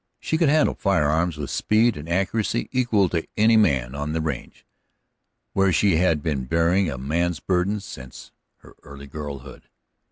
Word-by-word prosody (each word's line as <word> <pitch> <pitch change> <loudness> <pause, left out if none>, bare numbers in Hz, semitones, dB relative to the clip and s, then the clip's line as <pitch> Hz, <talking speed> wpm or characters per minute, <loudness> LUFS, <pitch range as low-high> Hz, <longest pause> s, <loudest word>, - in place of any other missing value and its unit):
She - - -2
could 165 - +3
handle 155 +1 +3
firearms 80 -3 +1
with 75 -2 -5
speed 110 +1 +2
and 75 +3 -8
accuracy 95 - -1
equal 120 -7 +2
to 85 -1 -2
any 110 +2 +5
man 70 - +2
on 75 +2 -4
the 80 - -1
range, 80 -1 -5 0.9
where 95 -1 +3
she 95 0 +3
had 80 -4 +1
been 70 -5 -2
bearing 85 +5 +2
a 70 - -5
man's 80 +5 -1
burden 95 +6 0
since 65 -9 -11 0.3
her - - -16
early 70 0 -11
girlhood. 70 -2 -9
85 Hz, 160 wpm, -23 LUFS, 75-100 Hz, 0.9 s, any